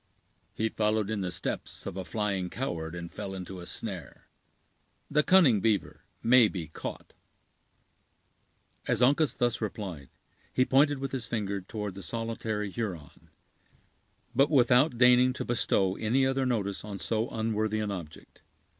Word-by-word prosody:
"He 110 - 0
followed 110 -1 0
in 105 -2 -1
the 90 -2 -2
steps - - -3
of 100 - -5
a 95 - -4
flying 100 -2 -2
coward, 85 -10 -4
and 85 0 -7
fell 95 0 -5
into 95 0 -7
a 90 - -9
snare. 95 -6 -5 0.9
The 150 - +4
cunning 150 - +5
beaver 105 -2 0 0.2
may 120 -1 +6
be 85 -7 -5
caught." - - -7 1.7
As - - +2
Uncas 145 +4 +3
thus 120 -1 0
replied, 95 - -5 0.4
he 130 - +2
pointed 145 +2 +4
with 135 0 -4
his 130 -4 -3
finger 100 -4 -2
toward 105 +1 -5
the 100 - -9
solitary 110 -2 -3
Huron, 95 -10 -6 1.0
but 135 +4 +4
without 125 -1 +4
deigning 125 +1 +6
to - - -4
bestow 95 -5 +1
any 125 +5 +2
other 135 0 +1
notice 100 -5 -1
on 105 -2 -6
so 110 +3 -1
unworthy 110 -1 -1
an 105 -1 -2
object. 85 -5 -9
110 Hz, 145 wpm, -29 LUFS, 95-125 Hz, 1.7 s, may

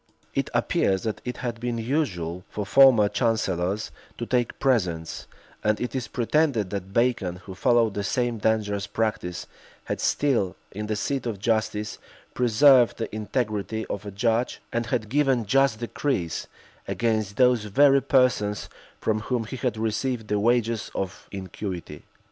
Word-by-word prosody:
It - - -1
appears 95 -1 +1
that 110 -2 -3
it 125 0 -4
had 120 -1 -3
been 120 0 -2
usual 95 - -2
for 105 - -4
former 125 -2 +6
chancellors 100 -4 0 0.3
to 120 - -3
take 120 0 0
presents; 90 -11 0 0.4
and 105 0 +2
it 125 - -3
is 130 -3 -3
pretended 120 -5 +1
that 95 -1 -4
Bacon, 115 -5 +1
who 95 - -7
followed 115 +1 +3
the 100 - -2
same 120 +2 -1
dangerous 105 -2 0
practice, 100 -5 -2 0.4
had - - -4
still, 115 -11 +1 0.2
in 105 +2 -5
the 110 - -1
seat 125 +4 -2
of 110 -3 -3
justice, 105 0 -1 0.3
preserved 125 +1 +5
the 115 - -4
integrity 110 -1 -2
of 100 - -4
a 105 - -6
judge, 115 +4 0
and 120 0 -1
had 115 -3 -1
given 135 -2 +2
just 135 +1 +3
decrees 120 - -2 0.4
against 110 -3 -1
those 125 -4 +4
very 140 +6 +5
persons 125 -6 +2 0.3
from 110 -1 0
whom 115 +2 -1
he 120 +4 -7
had 125 -4 -1
received 110 +1 -2
the 105 - +1
wages 115 0 +1
of 95 -1 -4
iniquity. 95 -5 -6
110 Hz, 150 wpm, -25 LUFS, 100-125 Hz, 0.4 s, former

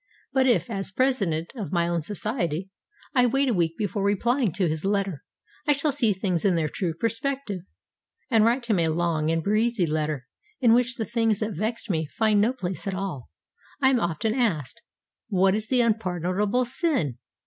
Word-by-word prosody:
But 265 -1 +3
if, 230 -10 +3
as 195 -2 -2
president 195 -9 0
of 215 -6 -5
my 170 -2 +1
own 170 -1 0
society, 190 - -2 0.4
I 250 -3 +4
wait 270 +2 +2
a - - +2
week 165 -3 0
before 205 -1 -2
replying 230 +3 +2
to 185 -2 +1
his 155 0 -2
letter, 195 -6 -1 0.4
I 295 - +6
shall 285 +2 0
see 255 -6 +2
things 185 -3 -1
in 190 -3 +3
their 160 -2 +1
true 170 -2 -2
perspective, 230 -1 -2 0.7
and 225 -2 +5
write 240 +2 +2
him 215 -6 +1
a 165 - +2
long 160 -1 0
and 165 0 0
breezy 215 0 +2
letter 155 -4 -2 0.3
in 235 -4 +5
which 245 +1 +2
the 220 - -3
things 225 -3 +1
that 215 0 -1
vexed 220 +7 -3
me 160 -3 -1
find 215 +4 +2
no 225 +4 +3
place 190 -7 -5
at 195 - -1
all. 185 -10 -5 0.5
I 265 -2 +4
am 255 - +3
often 175 +4 -1
asked, 225 - -1 0.5
What 190 -2 +3
is 215 +1 -2
the 250 0 +3
unpardonable 210 +1 0
sin? 245 - -1
205 Hz, 185 wpm, -25 LUFS, 170-235 Hz, 0.7 s, I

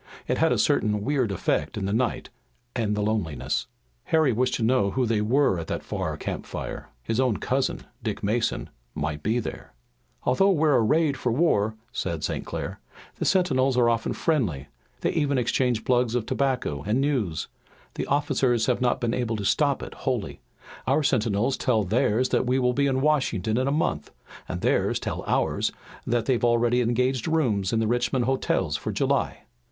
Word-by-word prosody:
It - - 0
had - - +3
a - - +2
certain 105 -1 +2
weird 130 -6 +1
effect 95 - -1
in 100 - -2
the 100 - -1
night 120 +2 -1 0.4
and 110 -3 0
the 105 - -1
loneliness. 80 - -1 0.4
Harry 155 -6 +3
wished 125 +3 +1
to 115 - -2
know 115 -3 +3
who 130 +5 0
they 110 -2 +1
were 120 -3 +2
at 80 - -6
that - - -3
far - - -3
campfire. - - -5
His 115 - -1
own 125 -5 +2
cousin, 130 +1 -1 0.2
Dick 110 -3 -4
Mason, 110 +3 -1 0.2
might 75 0 -3
be 110 +8 +1
there. 120 - -6 0.5
"Although 195 +11 +3
we're 155 -3 +3
arrayed 145 +5 +2
for 125 -2 -1
war," 110 -7 +2 0.2
said 85 -4 -3
St. - - -2
Clair, - - -5 0.4
"the - - -2
sentinels 135 -9 +2
are 120 -1 +4
often 115 -1 -1
friendly. 90 - -1 0.3
They - - +1
even 145 -4 +1
exchange 125 -1 +1
plugs 125 -2 +2
of 120 -3 0
tobacco 125 - -1
and 105 - 0
news. 120 - 0 0.5
The - - -4
officers 135 -5 +1
have 125 -1 0
not 125 -1 +2
been 120 -1 -1
able 120 -3 -1
to 105 -2 -4
stop - - +2
it - - -7
wholly. - - -3 0.5
Our 155 - +3
sentinels 120 -1 +1
tell 115 -4 +1
theirs 110 +4 +1
that - - +1
we'll 125 -1 +2
be 140 +2 +2
in 130 -1 +1
Washington 130 -8 +1
in 130 +2 +1
a - - +1
month, 110 - -1 0.4
and - - -4
theirs - - +1
tell - - -4
ours - - +1 0.4
that 120 -1 +1
they've 125 -3 +1
already 120 +1 +3
engaged 125 +1 0
rooms 120 - +1
in 115 - +1
the 115 - +1
Richmond 120 +2 +1
hotels 95 - 0
for - - -3
July." - - 0
120 Hz, 180 wpm, -25 LUFS, 105-130 Hz, 0.5 s, are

